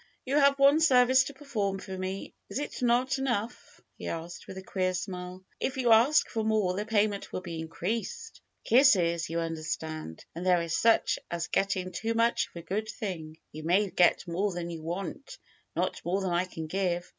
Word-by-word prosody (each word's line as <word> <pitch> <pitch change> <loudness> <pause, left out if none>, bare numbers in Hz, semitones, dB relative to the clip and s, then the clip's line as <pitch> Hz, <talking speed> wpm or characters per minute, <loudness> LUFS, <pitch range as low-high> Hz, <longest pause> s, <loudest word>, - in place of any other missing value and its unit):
"You 270 +3 +1
have 280 -1 +5
one 280 +2 +6
service 260 -3 +5
to 285 - -6
perform 215 -9 -2
for 190 0 -7
me, 185 +1 -5 0.2
is - - -4
it 290 -1 -4
not 250 +3 +2
enough?'^ 240 -3 -3 0.2
he - - -6
asked 165 +1 -6
with 190 - -8
a 190 - -7
queer 185 -1 -1
smile. 180 0 -5 0.2
"If 265 - -2
you 245 -3 +2
ask 240 +8 +5
for 225 -2 -2
more 215 -4 +1
the 205 +3 -3
payment 210 -2 +1
will - - -3
be 170 -3 -6
increased; 230 - -4 0.2
kisses, 180 - +4
you 165 +1 -1
un 165 0 -2
derstand; 155 - -5
and 170 - -6
there 180 -2 +3
is 165 -1 -2
such 230 +6 +3
a - - -13
thing - - -43
as 170 -1 -3
getting 190 -2 0
too 225 +6 -2
much 230 +1 +2
of - - -28
a 170 - -7
good 215 +3 -2
thing. 165 -8 -5
You 155 - -8
may 185 +5 +2
get 175 +1 +3
more 190 +4 0
than 175 -1 -4
you 165 -1 -6
want; 180 - -5 0.4
not - - -1
more 180 +3 0
than 190 -2 -1
I 175 +1 +1
can 160 -3 -7
give. 175 +1 -1
190 Hz, 205 wpm, -29 LUFS, 170-235 Hz, 0.4 s, one